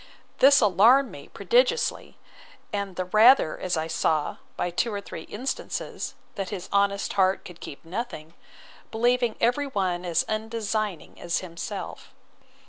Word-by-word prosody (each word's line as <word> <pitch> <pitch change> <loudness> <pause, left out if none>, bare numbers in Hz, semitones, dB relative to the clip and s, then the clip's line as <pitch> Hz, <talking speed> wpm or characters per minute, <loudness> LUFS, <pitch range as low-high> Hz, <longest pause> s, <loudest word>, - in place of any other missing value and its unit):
This 280 +1 +7
alarmed 225 +7 +5
me - - -11
prodigiously; 480 0 +1 0.6
and 200 -2 -3
the 185 - -2
rather, 215 - +5
as 180 -2 -1
I 160 - -1
saw, 155 -2 0 0.2
by 175 - -1
two 230 +7 0
or 205 - -3
three 200 - -9
instances, 250 +6 -4 0.2
that 195 -2 -4
his 190 -4 -6
honest 200 0 +1
heart 190 -1 +2
could 175 -2 -11
keep 145 - -10
nothing, 170 -4 -6 0.6
believing 240 0 +1
every 245 +5 +1
one 185 -7 -1
as 170 -2 0
undesigning 215 -4 -3
as 170 - -1
himself. 170 -1 -7
200 Hz, 135 wpm, -26 LUFS, 180-235 Hz, 0.6 s, This